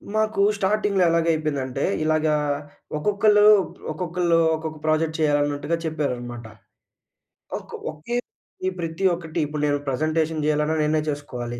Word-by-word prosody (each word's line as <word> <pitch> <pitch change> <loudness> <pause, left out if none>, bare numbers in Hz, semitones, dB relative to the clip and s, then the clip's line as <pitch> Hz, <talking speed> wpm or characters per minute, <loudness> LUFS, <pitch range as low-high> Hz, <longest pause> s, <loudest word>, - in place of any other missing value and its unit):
మాకూ 215 -2 +1 0.2
స్టార్టింగ్‌లో 200 -1 +1
ఎలాగయిపోయిందంటే, 155 -5 0 0.2
ఇలాగా 155 0 +2 0.6
ఒక్కొక్కళ్ళూ 210 +5 +4 0.2
ప్ - - -16
ఒక్కొక్కళ్ళూ 170 +1 0 0.2
ఒక్కొక్క 160 0 -6
ప్రాజెక్ట్ 155 0 +1
చెయ్యాలన్నట్టుగా 145 0 +1
చెప్పారనమాట. 125 -6 -3 1.1
ఒక్ - - -12 0.2
ఒకే 235 +11 -4 0.6
ప్రతి 165 +3 -3
ఒక్కటి 165 -2 -4
ఇప్పుడు 150 0 -4
నేను 145 0 +2
ప్రజెంటేషన్ 155 +3 0
జెయ్యాలన్నా 150 +1 +1
నేనే 155 +1 +2
చేసుకోవాలి. 125 -5 -5
155 Hz, 110 wpm, -23 LUFS, 145-170 Hz, 1.1 s, ఒక్కొక్కళ్ళూ